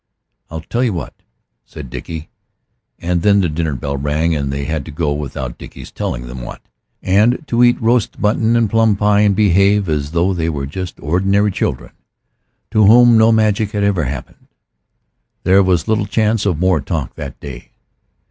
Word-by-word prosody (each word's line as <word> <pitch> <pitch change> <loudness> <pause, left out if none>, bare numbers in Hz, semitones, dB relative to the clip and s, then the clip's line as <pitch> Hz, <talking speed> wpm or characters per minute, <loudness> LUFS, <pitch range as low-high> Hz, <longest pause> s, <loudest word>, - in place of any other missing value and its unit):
"I'll 80 +1 -6
tell 120 +9 -2
you 120 -5 0
what," 85 -6 -5 0.5
said 75 -6 -11
Dickie. 80 +5 -7 0.7
And 85 0 -1
then 100 +1 +4
the 95 - +2
dinner 80 -2 -2
bell 70 +2 -4
rang, 75 +4 0
and 70 -2 -2
they 70 0 -3
had 80 -1 -3
to 80 - -8
go 75 0 -1
without 65 -4 -5
Dickie's - - -11
telling - - -4
them 60 +1 -8
what, - - -8 0.4
and 105 - +2
to 120 -1 +2
eat 120 +1 +4
roast 120 -1 +1
mutton 110 +2 +1
and 115 -1 +2
plum 115 0 +2
pie, 105 0 +2
and 105 -2 +3
behave 100 0 +3
as 75 -3 -1
though 85 +4 +1
they 85 -2 -1
were 70 -4 -3
just 90 +6 -7
ordinary 95 +6 +1
children - - -3 0.8
to 110 - +3
whom 120 +3 +6
no 110 0 +5
magic 110 -1 +1
had 105 -1 -1
ever 95 -6 +1
happened. 70 +2 -7 1.0
There 95 +1 +4
was 90 -2 +1
little 110 -2 0
chance 110 0 0
of 90 -6 0
more 90 -2 +1
talk 75 -3 -4
that - - -8
day. 65 -4 -10
95 Hz, 180 wpm, -17 LUFS, 75-105 Hz, 1.0 s, whom